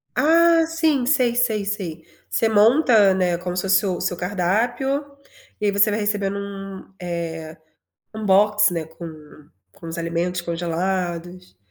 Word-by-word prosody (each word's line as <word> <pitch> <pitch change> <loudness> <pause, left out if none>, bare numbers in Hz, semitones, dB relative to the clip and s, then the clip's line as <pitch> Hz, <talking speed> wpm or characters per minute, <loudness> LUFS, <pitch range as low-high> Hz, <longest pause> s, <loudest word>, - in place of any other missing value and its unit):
Ah, 330 +1 +4
sim, 320 -5 +1
sei 250 -3 +2
sei 220 -4 +1
sei. 180 -6 -5 0.2
Você 225 - +1
monta, 220 -2 +5
né, 180 -2 0
como 180 0 -5
se 180 - -2
fosse 195 +1 +3
o 180 -2 -2
seu 175 - -2
cardápio, 225 - -1 0.5
e 210 - -2
aí 205 - +3
você 200 +1 +3
vai 210 - -1
recebendo 205 -1 -1
um, 195 -1 -8
eh, 165 -2 -5 0.6
um 220 0 -5
box, 210 +1 +4
né, 165 -2 -3
com 155 -2 -12 0.2
com 165 - -12
os 165 - -6
alimentos 170 +1 -2
congelados. 175 - -4
195 Hz, 150 wpm, -22 LUFS, 175-220 Hz, 0.6 s, monta